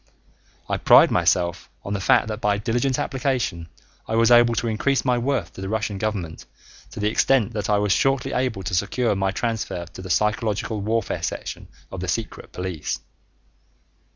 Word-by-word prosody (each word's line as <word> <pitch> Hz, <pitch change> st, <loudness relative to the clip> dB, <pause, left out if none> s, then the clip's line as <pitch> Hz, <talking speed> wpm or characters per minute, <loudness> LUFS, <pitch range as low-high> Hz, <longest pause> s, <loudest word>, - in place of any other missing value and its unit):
I -, -, -1 dB
pride -, -, +6 dB
myself 85 Hz, -1 st, +1 dB, 0.2 s
on 100 Hz, -, -3 dB
the 100 Hz, -, -1 dB
fact 100 Hz, -, +3 dB
that 110 Hz, 0 st, -5 dB
by 105 Hz, -1 st, +2 dB
diligent 120 Hz, +5 st, 0 dB
application 125 Hz, -11 st, -2 dB, 0.4 s
I 110 Hz, -, -1 dB
was 115 Hz, +1 st, +4 dB
able 120 Hz, -1 st, +6 dB
to 115 Hz, -, -1 dB
increase 130 Hz, +6 st, 0 dB
my 125 Hz, -1 st, +2 dB
worth 120 Hz, -8 st, -1 dB
to -, -, -9 dB
the 95 Hz, -, -4 dB
Russian 110 Hz, -2 st, -2 dB
government 95 Hz, -, -3 dB, 0.4 s
to -, -, -9 dB
the 105 Hz, -, +1 dB
extent 120 Hz, -1 st, +2 dB
that 105 Hz, -2 st, -3 dB
I 105 Hz, -, +3 dB
was 105 Hz, -1 st, +1 dB
shortly 135 Hz, +4 st, +1 dB
able 125 Hz, -6 st, -1 dB
to 90 Hz, -, -4 dB
secure 115 Hz, +5 st, +1 dB
my 95 Hz, 0 st, 0 dB
transfer 105 Hz, -4 st, -3 dB
to 85 Hz, +2 st, -11 dB
the 95 Hz, -, -8 dB
psychological 105 Hz, +1 st, 0 dB
warfare 110 Hz, +1 st, -1 dB
section -, -, -5 dB, 0.2 s
of -, -, -6 dB
the -, -, -4 dB
secret -, -, -4 dB
police. 90 Hz, -4 st, -4 dB
110 Hz, 180 wpm, -23 LUFS, 95-120 Hz, 0.4 s, pride